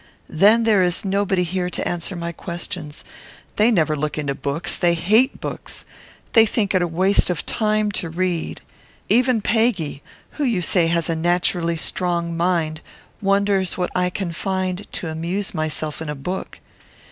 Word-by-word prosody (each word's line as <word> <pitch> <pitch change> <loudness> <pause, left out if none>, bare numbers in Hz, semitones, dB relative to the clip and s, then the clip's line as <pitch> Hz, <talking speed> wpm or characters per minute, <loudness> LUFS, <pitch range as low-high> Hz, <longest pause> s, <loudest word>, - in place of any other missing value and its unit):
Then 210 +8 +5
there 215 -4 +4
is 180 +2 0
nobody 195 -1 +1
here 180 +1 -2
to - - -3
answer 175 +2 -3
my 170 0 -4
questions. 170 -2 -6 0.5
They 215 +3 +5
never 160 -8 +2
look 150 +1 -3
into 145 -2 -1
books. 140 +5 -2
They 175 -1 +2
hate 215 +10 +3
books. - - -5 0.5
They 225 - +8
think 205 -1 0
it 180 -2 +2
waste 185 +5 +3
of 180 - -2
time 215 -1 +1
to 170 - -5
read. 175 0 -2 0.5
Even 250 -2 +3
Peggy, 210 - +1 0.3
who 300 - -4
you 225 -9 +1
say 170 -1 +4
has 170 -1 +1
naturally 170 +1 +1
a - - -5
strong 170 0 -1
mind, 165 -2 0 0.4
wonders 195 -2 +1
what 180 -1 -1
I 180 0 +1
can 180 -1 -3
find 185 +2 -3
to 175 - -3
amuse 170 +5 -2
myself 155 -1 -3
in 160 - -4
a 150 - -3
book. 180 +8 -5
180 Hz, 160 wpm, -21 LUFS, 165-200 Hz, 0.5 s, They